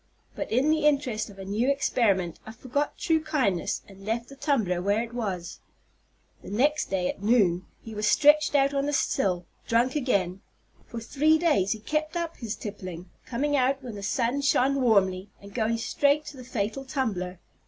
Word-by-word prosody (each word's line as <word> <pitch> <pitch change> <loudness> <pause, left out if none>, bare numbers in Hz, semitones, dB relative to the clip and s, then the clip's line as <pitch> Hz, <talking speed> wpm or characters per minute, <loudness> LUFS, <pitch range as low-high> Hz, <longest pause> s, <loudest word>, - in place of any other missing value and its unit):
But - - -5
in 260 +7 +3
the 310 -1 +3
interest 265 -8 0
of 200 - -13
a 195 - -8
new 215 +7 0
experiment 200 - +1
I 220 - -9
forgot 265 +5 -2
true 325 -2 +2
kindness, 230 - 0
and 195 -1 -14
left 230 +3 -2
the 275 - -11
tumbler 235 - 0
where 205 +4 +1
it 235 0 -9
was. 185 -7 -4 0.8
The - - -10
next 285 +9 +1
day, 185 -2 0
at - - -4
noon, 200 -5 +3 0.2
he 225 - -8
was 210 0 -1
stretched 300 +3 +5
out 275 0 +4
on 280 0 0
the 295 - -1
sill, 185 -11 0 0.2
drunk 240 +4 +2
again. 195 -10 0 0.5
For 235 - -6
three 300 +7 +3
days 295 - +2
he 220 - -9
kept 305 +7 -2
up 335 -1 -3
his 230 -2 -4
tippling, 185 -4 -7 0.2
coming 290 +4 0
out 270 0 +1
when 245 -3 -6
the 205 - -7
sun 235 +6 0
shone 275 0 +2
warmly, 195 -5 +2
and 200 0 -13
going 230 -1 0
straight 285 +5 +1
to 300 -2 -9
the 255 - -9
fatal 240 +1 -3
tumbler. 215 -10 -2
235 Hz, 185 wpm, -27 LUFS, 200-280 Hz, 0.8 s, stretched